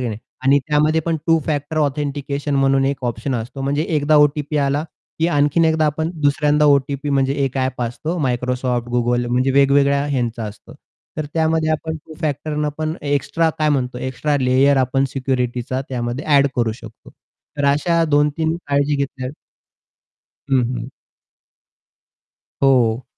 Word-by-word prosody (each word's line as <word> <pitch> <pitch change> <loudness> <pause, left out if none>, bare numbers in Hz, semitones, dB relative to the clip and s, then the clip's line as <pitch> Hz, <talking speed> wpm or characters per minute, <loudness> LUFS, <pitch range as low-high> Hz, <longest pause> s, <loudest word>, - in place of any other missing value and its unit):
नाही 110 -3 -3 0.3
आणि 140 +2 +5
त्यामध्ये, 155 +2 +2 0.3
टू 165 -1 +4
फॅक्टर 145 0 -2
ऑथेंटिकेशन 145 -1 -2
म्हणून 135 0 +3
एक 135 -2 -2
ऑप्शन 120 +3 -2
असतो. 120 +4 -5
म्हणजे 140 +2 0
एकदा 150 -1 +2
ओ-टी-पी 150 0 +2
आला, 140 +1 +1 0.4
की 165 - +2
आणखीन 145 +1 +2
एकदा 160 -1 +2
आपण 160 +2 -1
दुसऱ्यांदा 150 +1 +3
ओ-टी-पी 140 0 +2
म्हणजे 135 -1 +2
एक 135 0 -3
ॲप 130 -1 -1
असतो 150 +9 -3
Microsoft, 125 -1 -1
Google 120 0 +1
म्हणजे 130 +2 +2
वेगवेगळ्या 140 0 +3
ह्यांचा 120 -5 -2
असतो. 105 0 -10 0.4
तर 155 - -3
त्यामध्ये 160 0 +1
आपण 160 +1 -2
टु-फॅक्टरनं 150 -1 -3
पण 155 0 -2 0.2
एक्स्ट्रा 160 +4 +1
काय 155 -1 +2
म्हणतो? 130 -3 -1
एक्स्ट्रा 145 +3 -1
लेयर 130 +2 +3
आपण 135 +2 0
सिक्युरिटीचा 130 -1 -2
त्यामध्ये 120 +1 -3
एड 140 0 +5
करू 115 -2 +1
शकतो. 110 - -13 0.5
तर 145 - -1
अशा 165 +3 +2
2-3 150 +2 +1
काळजी 145 +1 +1
घेतल्या. 135 -2 -4 1.2
हं, 130 -2 +4
हं. 120 +3 -6 1.7
हो. 125 -3 +3
140 Hz, 140 wpm, -20 LUFS, 130-150 Hz, 1.7 s, आणि